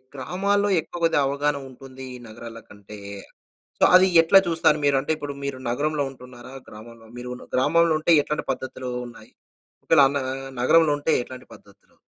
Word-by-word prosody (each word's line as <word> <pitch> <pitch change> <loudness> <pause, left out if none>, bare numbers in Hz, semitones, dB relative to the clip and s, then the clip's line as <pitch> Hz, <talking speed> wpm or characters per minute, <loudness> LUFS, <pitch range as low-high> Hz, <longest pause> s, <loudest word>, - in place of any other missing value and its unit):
గ్రామాల్లో 200 +9 -1
ఎక్కువ 175 +2 -10
కొద్దిగావగాహనుంటుందీ 135 -3 -2
ఈ - - -8
నగరాలకంటే. 110 -2 -12 0.8
సో, - - +1
అది 185 +1 +6 0.2
ఎట్లా 195 +4 +6
చూస్తారు 165 -2 +2
మీరు? 140 -1 +3
అంటే, 145 - -3
ఇప్పుడు 145 -2 -6
మీరు 135 -2 -4
నగరంలో 145 +3 -1
ఉంటున్నారా, 125 0 -13 0.2
గ్రామంలో? 115 +1 -14
మీరు 125 0 -7
ఉన్ - - -13
గ్రామంలుంటే, 160 +4 +2
ఎట్లాంటి 150 - -4
పద్ధతులూ 130 -1 -6 0.2
ఉన్నాయి? 115 -1 -15 0.5
ఒకవేళ 160 -3 +4
అన్న్ 140 -1 -2 0.4
నగరంలో 160 +3 +4
ఉంటే 145 +2 -1
ఎట్లాంటి 130 0 -12
పద్ధతులు? 100 0 -21
140 Hz, 140 wpm, -23 LUFS, 125-155 Hz, 0.8 s, అది